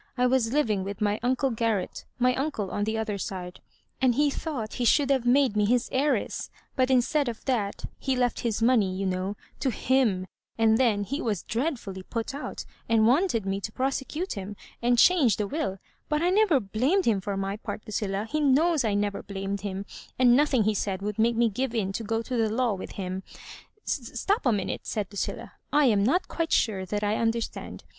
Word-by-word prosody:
I 250 - +3
was 250 -3 +2
living 220 -9 +1
with 200 +1 -5
my 210 0 +1
uncle 260 +2 +1
Garret 225 -4 -1
— - - -47
my 255 - +4
uncle 260 -8 -2
on 205 - -1
the 220 +1 -1
other 215 -2 -2
side; 180 -1 -6 0.4
and 255 -2 +4
he 290 +1 +3
thought 270 -9 -4
he - - +2
should 280 +3 +4
have 260 -3 +1
made 260 -3 +4
me 210 - +3
his 240 +3 +1
heiress; 285 +3 0 0.3
but 255 -1 +2
instead 265 +2 +2
of 230 - -8
that, 220 -7 -1
he 265 -1 0
left 245 -1 +1
his 225 -1 -1
money, 220 -6 +3
you 195 +1 -2
know, 185 +2 -2 0.2
to 270 - +1
him; 235 -6 +1 0.3
and 225 -1 +4
then 220 -6 +3
he 275 +9 -3
was 210 -6 -1
dreadfully 230 - -3
put 230 +6 -4
out, 285 - -6 0.2
and 225 -1 +4
wanted 250 - +2
me 195 0 -2
to 215 - -4
prosecute 270 - -2
him 200 0 -6 0.3
and 240 0 +3
change 275 - +5
the 210 - 0
wUl; 285 -8 -2 0.3
but 300 +2 +1
I 355 - +3
never 390 -7 +4
blamed 255 - +1
him, 210 -4 +2
for 200 +1 -3
my 195 +1 -2
part, 215 - -6
Lucilla 205 0 -2
— - - -18
^he 305 - +1
knows 295 +2 +3
I 215 -3 +1
never 205 -1 -1
blamed 195 0 -4
him 195 -1 -4 0.2
— - - -21
and 245 -1 +6
nothing 275 -4 +3
he 215 +1 +2
said 195 -1 -2
wou]d 210 +1 -3
make 235 +1 +3
me 235 +1 +3
give 245 +3 -2
in 195 -4 0
to 225 - -3
go 225 +1 -1
to 250 - -4
the 225 -2 +2
law 235 0 +1
with 190 - -7
him 185 -1 -4 0.2
" - - -13
*' 425 - -38
Stop 270 - -1
a - - +5
minute," 205 -3 -2
said 210 -2 -1
Lucilla, 200 - -4
" - - -46
I 295 0 +4
am 210 -5 +4
not 345 - +2
quite 330 -1 -2
sure 190 -4 +1
that 210 +2 -2
I 210 +1 +1
understand. 230 0 -2
230 Hz, 220 wpm, -27 LUFS, 205-265 Hz, 0.4 s, and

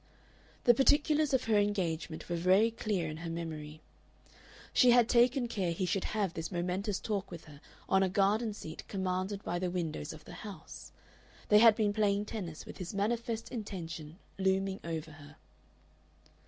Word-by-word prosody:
The 240 - +7
particulars 295 +3 +3
of 265 -2 +2
her 220 -2 +3
engagement 170 -6 -1
were 175 - -2
very 190 +6 +4
clear 205 -7 -2
in 155 0 -5
her 165 +1 -6
memory. 155 -2 -6 0.9
She 250 - +6
had 240 -1 +6
taken 245 +1 +3
care 190 -6 -1
he 185 +3 -1
should 185 +1 -1
have 205 -5 -1
this 165 +3 -5
momentous 185 +3 -1
talk 200 -3 -3
with 170 -2 -9
her 145 -2 -14 0.3
on 190 - +3
a 190 - +2
garden 205 +3 +1
seat 160 -6 -8
commanded 190 +1 -2
by 175 +1 -2
the 180 0 -1
windows 165 - -3
of - - -12
the - - -10
house. - - -9 0.6
They 210 - +7
had 225 -1 +8
been 210 -2 +1
playing 205 -1 +1
tennis, 180 -8 -6
with - - -10
his 180 +2 -5
manifest 230 +2 -1
intention 165 -8 -6 0.2
looming 190 0 +1
over 160 -1 -4
her. 145 -1 -14
190 Hz, 170 wpm, -32 LUFS, 170-215 Hz, 0.9 s, had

